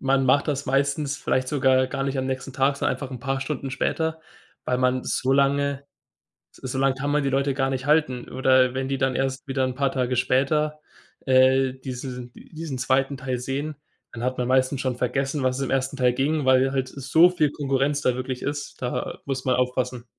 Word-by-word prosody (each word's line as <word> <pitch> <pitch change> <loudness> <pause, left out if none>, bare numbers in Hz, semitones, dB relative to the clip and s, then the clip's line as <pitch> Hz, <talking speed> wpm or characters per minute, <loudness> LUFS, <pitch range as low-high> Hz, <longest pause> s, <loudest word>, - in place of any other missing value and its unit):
man 135 0 +2
macht 140 +4 +3
das 140 -1 -2
meistens 140 +2 0
vielleicht 130 0 -1
sogar 130 -2 +3
gar 135 +1 -3
nicht 135 -1 -2
am 130 - -1
nächsten 130 0 -4
Tag, 135 +1 +1
sondern - - 0
einfach 135 -2 -7
'n 130 - -6
paar 135 0 -2
Stunden 135 -1 -4
später, 160 +4 -1 0.4
weil 125 - 0
man 130 0 +1
so 130 +1 0
lange 140 0 +1 0.7
s - - -19
so 130 - -3
lang 135 0 +2
kann 140 +2 -3
man 150 0 +2
die 135 - 0
Leute 135 0 +1
gar 135 0 0
nicht 130 +1 -3
halten 150 -5 +1
oder 130 -1 +3
wenn 130 0 -2
die 135 -1 -1
dann 135 -1 +1
erst 135 +2 -2
wieder 135 0 0
'n 130 -1 -2
paar 140 0 +1
Tage 125 -1 -1
später, 150 +5 +1 0.5
äh, 130 0 +4
diese 125 -1 -7
diesen 155 -5 -7
2. 135 +2 +1
Teil 130 -1 -3
sehen, 140 +5 -3 0.4
dann 120 0 -7
hat 130 0 -1
man 125 - 0
meistens 130 +1 +2
schon 130 -2 -1
vergessen, 135 +4 -1
um - - -2
was 130 0 +1
es 140 - -1
im - - -4
1. 135 +1 0
Teil 125 -2 +3
ging, 145 +4 0
weil 130 0 +4
halt 130 -1 -1
so 140 +7 +4
viel 155 -5 +1
Konkurrenz 140 0 0
da 125 - +2
wirklich 130 0 -4
ist, 145 0 -5
da 125 - -3
muss 135 -2 -3
man 130 - +3
aufpassen. 125 -1 -1
135 Hz, 215 wpm, -24 LUFS, 130-140 Hz, 0.7 s, äh